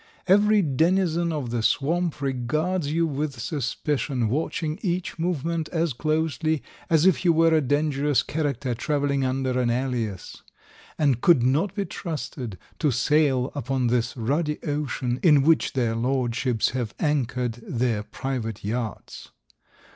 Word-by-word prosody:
Every 205 +2 +4
denizen 170 +3 +1
of 140 -7 -3
the 120 -1 -1
swamp 160 +6 0
regards 145 +5 -1
you 165 +2 +2
with 145 -3 -3
suspicion, 130 -2 -1
watching 155 +4 -2
each 175 -2 -2
movement 165 -1 -1
as 165 -3 0
closely 155 +2 0 0.3
as 160 0 +4
if 190 -2 +3
you 175 - +5
were 165 0 +4
a 160 - +4
dangerous 145 0 +1
character 140 -4 -2
traveling 140 +2 0
under 130 0 0
an 125 -1 +1
alias, 120 -6 -3 0.6
and 140 -6 +2
could 165 -9 +5
not 155 +10 +1
be 200 -2 -1
trusted 145 - -5 0.2
to 155 - +2
sail 135 0 +2
upon 135 -2 -1
this 125 +1 0
ruddy 150 +6 0
ocean 140 -4 -2
in 150 -5 +5
which 160 +1 +3
their 120 -4 0
lordships 120 -1 0
have 120 -3 -3
anchored 125 -5 -1
their 120 -3 0
private 115 -1 -4
yachts. 110 +1 -5
140 Hz, 135 wpm, -25 LUFS, 125-160 Hz, 0.6 s, you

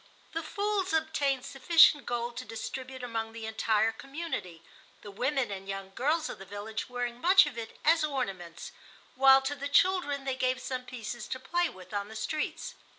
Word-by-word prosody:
The 330 - -1
fools 400 +2 -1
obtained 285 -4 +1
sufficient 290 +1 +5
gold 240 0 -2
to 255 - -4
distribute 255 +3 -6
among 225 -2 -3
the 225 -1 -6
entire 220 0 +2
community, 270 - -6 0.4
the 205 - -8
women 255 +2 0
and 195 0 -6
young 195 0 -5
girls 305 +6 +1
of - - -7
the - - -8
village 205 +4 -5
wearing 245 -1 -3
much 375 +1 +7
of 290 -4 -5
it 230 -1 -7
as 325 +1 +5
ornaments, 195 - -3 0.4
while 270 +1 +7
to 270 +2 -1
the 280 0 -5
children 290 -5 +3
they 265 -1 -1
gave 255 0 0
some 255 0 -4
pieces 240 -2 -6
to 260 - -4
play 345 +7 0
with 185 +2 -13
on 200 0 -2
the 220 - -11
streets. 310 - -3
255 Hz, 180 wpm, -30 LUFS, 220-295 Hz, 0.4 s, much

